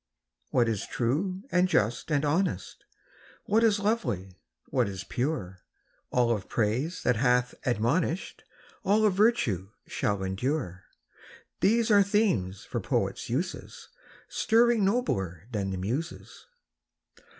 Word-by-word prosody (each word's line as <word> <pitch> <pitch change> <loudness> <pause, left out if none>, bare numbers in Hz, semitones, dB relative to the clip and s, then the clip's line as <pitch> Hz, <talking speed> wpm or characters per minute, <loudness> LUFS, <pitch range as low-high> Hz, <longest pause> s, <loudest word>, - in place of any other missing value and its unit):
What 120 -2 +2
is 110 -4 -2
true 160 - -1
and 180 0 +4
just 120 - 0
and 150 -1 +1
honest, 170 +6 -1 0.6
What 220 +3 +3
is 220 -2 +4
lovely, 105 - -2 0.3
what - - +1
is 95 -1 -6
pure, 120 - -3 0.3
— - - -41
All 120 -1 +2
of 100 - -8
praise 125 +11 -1
that 125 -2 +2
hath 125 0 +2
admonish'd, 125 - 0 0.4
All 215 +3 +3
of 205 - +3
virtue, 185 - +2 0.2
shall 100 -2 -1
endure, 95 - -2 0.4
— - - -22
These 225 +2 +3
are 205 -1 +7
themes 190 - +1
for - - -3
poets' - - -2
uses, 160 +10 -4 0.4
Stirring 235 -1 +3
nobler 100 - 0
than 100 -4 -2
the 95 - -3
Muses. 125 - -5
135 Hz, 130 wpm, -28 LUFS, -, 0.6 s, are